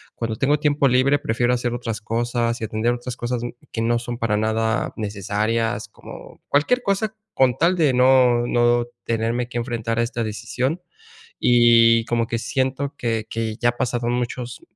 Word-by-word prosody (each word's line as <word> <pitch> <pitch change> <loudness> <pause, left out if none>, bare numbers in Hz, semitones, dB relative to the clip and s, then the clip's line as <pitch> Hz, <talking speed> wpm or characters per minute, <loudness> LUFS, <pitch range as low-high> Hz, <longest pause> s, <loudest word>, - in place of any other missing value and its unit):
Cuando 115 -1 -3
tengo 145 +6 +1
tiempo 145 -2 +2
libre 130 +3 +3
prefiero 120 0 0
hacer 120 -1 -1
otras 115 -2 -4
cosas 120 +1 -1
y - - -4
atender 110 +2 0
otras 120 0 -6
cosas, 120 0 -3
mm, 120 - -3 0.2
que 115 - -3
no 120 +1 +2
son 120 0 -5
para 110 -2 0
nada 110 +1 0
necesarias, 110 +2 -2
como - - -13
cualquier 200 - +2
cosa 215 +1 -1 0.2
con 130 -1 +2
tal 170 +5 +3
de 155 -7 +2
no 125 -1 +4
no 120 0 +2 0.2
tenerme 115 +2 -1
que 120 - -5
enfrentar 115 -1 -2
a 120 - +2
esta 120 0 -3
decisión. 125 - -3 0.6
Y 115 -1 +5
como 115 0 0
que 115 - -2
siento 130 +4 -2
que 115 -2 -2
que 115 -1 -3
ya 120 - +2
ha 120 - -4
pasado 120 -1 -1
muchos 120 0 -3
120 Hz, 175 wpm, -22 LUFS, 115-125 Hz, 0.6 s, Y